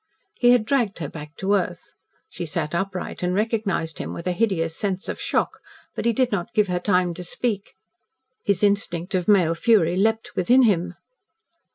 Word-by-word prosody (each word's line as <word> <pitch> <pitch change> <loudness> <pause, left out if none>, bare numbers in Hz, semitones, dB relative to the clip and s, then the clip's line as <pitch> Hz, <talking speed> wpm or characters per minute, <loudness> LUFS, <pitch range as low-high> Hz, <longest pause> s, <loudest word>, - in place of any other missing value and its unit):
He 245 - +5
had 245 -3 +5
dragged 235 -5 +1
her 155 - -4
back 150 0 -10
to 195 +1 0
earth. 205 - -2 0.3
She 175 - -6
sat 155 -1 -3
upright 190 +1 -3
and 180 0 0
recognised 210 -6 -1
him - - -4
with 170 - -7
a 180 - +1
hideous 175 -5 0
sense 190 0 -2
of - - -5
shock, - - -1 0.3
but - - -4
he 235 - +4
did 250 +2 +1
not 185 -4 -3
give 210 -2 +3
her 180 0 0
time 180 -2 +1
to 180 - -7
speak. 205 +3 -3 0.7
His 200 -1 0
instinct 200 -3 +1
of 180 -2 0
male 185 -6 +4
fury 175 -1 +3
leaped 220 +3 0
within 245 +8 +4
him. 180 -5 +1
190 Hz, 185 wpm, -23 LUFS, 175-215 Hz, 0.7 s, He